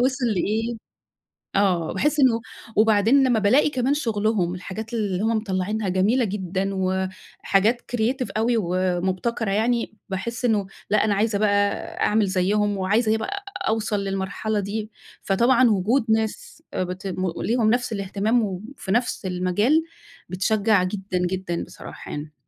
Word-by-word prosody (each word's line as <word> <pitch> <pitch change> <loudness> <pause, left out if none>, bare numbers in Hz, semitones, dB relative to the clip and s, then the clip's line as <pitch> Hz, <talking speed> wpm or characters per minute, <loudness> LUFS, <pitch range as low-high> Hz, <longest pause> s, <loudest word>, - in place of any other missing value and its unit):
وِصل 260 +1 +1
لإيه 220 +3 0 0.8
آه 185 -5 +2
باحس 295 +10 +1
إنه 245 -4 +4 0.3
وبعدين 220 +5 +4
لمّا 235 -3 +3
بالاقي 250 +9 +4
كمان 260 0 +1
شُغلهم 215 - 0
الحاجات 215 +5 -7
اللي 200 -4 -1
هُم 225 0 +2
مطلّعينها 200 0 -2
جميلة 205 +7 +2
جدًا، 190 -1 -2
وحاجات 190 +4 0
creative 245 +2 0
أوي، 235 +2 +2
ومبتكرة 185 +3 -1
يعني، 230 +2 0 0.2
باحس 235 +6 -3
إنه 210 -5 +1 0.2
لأ 210 0 +3
أنا 205 -2 +2
عايزة 210 0 +1
بقى 215 -1 +3 0.5
أعمل 215 0 +3
زيُّهم، 200 +2 +1
وعايزة 215 +4 +2
إيه 220 - +3
بقى 400 - -4 0.2
أوصل 215 -2 0
للمرحلة 195 +2 -2
دي، 210 +2 -4 0.3
فطبعًا 240 +5 +4
وجود 220 +5 +2
ناس 220 +7 -2
بت 185 +1 -3 0.3
ليهم 230 -1 +1
نفس 245 0 +1
الاهتمام، 205 +4 0
وفي 200 +3 -5
نفس 240 -1 0
المجال 185 - +2 0.5
بتشجّع 200 +2 +2
جدًا 190 0 -3
جدًا 180 -1 -2
بصراحة - - -10
يعني. 150 +1 -6
210 Hz, 135 wpm, -23 LUFS, 190-230 Hz, 0.8 s, إنه